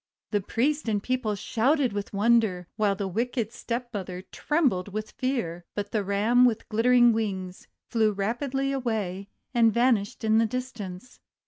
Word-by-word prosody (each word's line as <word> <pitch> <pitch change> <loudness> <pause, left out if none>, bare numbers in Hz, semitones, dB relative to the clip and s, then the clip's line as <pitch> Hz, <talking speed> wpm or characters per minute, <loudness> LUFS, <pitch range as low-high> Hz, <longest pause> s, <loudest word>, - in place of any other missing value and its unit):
The 205 -2 +1
priest 275 +6 0
and 205 -2 0
people 250 -5 -1
shouted 255 +5 +1
with 205 -1 -4
wonder, 210 -3 +2
while 210 -2 +1
the 195 0 -3
wicked 230 +3 -2
stepmother 210 -7 -5
trembled 250 - 0
from 215 +2 -2
fear. 215 -8 -3
But 205 0 -3
the 215 -2 0
Ram 210 +5 +3
with 230 -3 +2
glittering 240 +2 +5
wings, 190 -5 -3 0.2
flew 220 -3 +3
rapidly 250 +7 -1
away 210 -7 -2 0.2
and 230 -2 +5
vanished 235 -1 +1
in 220 0 +4
the 225 - +3
distance. 235 -3 -6
220 Hz, 145 wpm, -27 LUFS, 200-245 Hz, 0.2 s, glittering